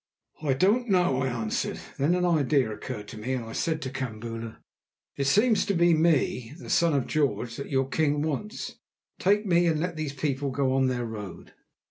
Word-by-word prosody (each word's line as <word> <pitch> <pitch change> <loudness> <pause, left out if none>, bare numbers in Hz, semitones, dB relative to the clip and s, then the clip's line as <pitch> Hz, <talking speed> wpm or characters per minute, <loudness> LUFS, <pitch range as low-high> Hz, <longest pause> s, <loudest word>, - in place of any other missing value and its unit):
"I 145 -4 +1
don't 215 - +2
know," 175 -9 +3
I 130 - +1
answered. 115 -4 -2 0.2
Then 150 +6 +3
an 180 0 +1
idea 145 -7 +2
occurred 105 -2 -7
to 110 - -8
me, 125 +5 -2
and 125 -3 -2
I 115 - -8
said 160 +5 -1
to 130 - -4
Kambula: 115 -3 -5 0.6
"It 140 - -1
seems 210 - +4
to 200 - +1
be 170 0 +5
me, 155 -5 +1
the - - -7
son 170 -3 +3
of 135 - +1
George, 135 -6 0
that 140 - -6
your 135 -1 +1
king 145 +1 +1
wants. 160 - -4 0.4
Take 205 +3 +3
me, 175 -2 +3
and 160 -2 +2
let 170 0 -2
these 155 -3 -3
people 140 0 -1
go 130 0 0
on 135 0 +3
their 125 -2 -1
road." 105 -5 -8
140 Hz, 195 wpm, -27 LUFS, 130-170 Hz, 0.6 s, be